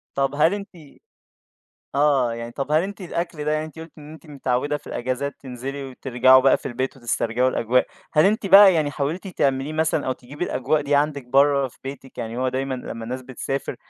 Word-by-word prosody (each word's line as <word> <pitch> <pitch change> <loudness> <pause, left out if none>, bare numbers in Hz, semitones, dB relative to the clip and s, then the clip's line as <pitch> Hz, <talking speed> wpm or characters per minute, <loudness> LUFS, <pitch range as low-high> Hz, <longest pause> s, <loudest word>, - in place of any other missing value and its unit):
طَب 135 0 0
هل 160 +5 +4
أنتِ 205 -1 -5 1.3
آه، 140 -4 +3
يعني 115 0 -7
طَب 140 +4 -4
هل 155 +2 +4
أنتِ 200 +2 -6
الأكل 170 -3 -4
ده 150 - 0
يعني 155 0 0
أنتِ 155 0 -13
قُلتِ 160 0 -10
إن 150 +1 -11
أنتِ 160 - -14
متعوّدة 145 0 -1
في - - -16
الإجازات 130 +3 -3
تنزِلي 135 +2 -6
وترجَعوا 130 0 +4
بقى 135 0 +5
في - - -10
البيت 130 +2 -3
وتسترجِعوا 120 +1 0
الأجواء، 125 0 +1 0.3
هل 155 0 +4
أنتِ 205 0 +2
بقى 195 -1 +8
يعني 155 -3 +1
حاولتِ 155 +7 -3
تعمليه 140 -4 0
مثلًا 160 -1 0
أو 130 - +1
تجيبي 140 +7 -6
الأجواء 150 0 0
دي 145 0 0
عندِك 145 -2 +1
برّه 140 +1 +3
في - - -22
بيتِك، 135 -1 -9
يعني 115 0 -4
هو 130 0 +1
دايمًا 130 +1 -2
لمّا 115 -2 -7
الناس 125 +3 -5
بتسافر 135 +2 -4
140 Hz, 200 wpm, -23 LUFS, 130-155 Hz, 1.3 s, بقى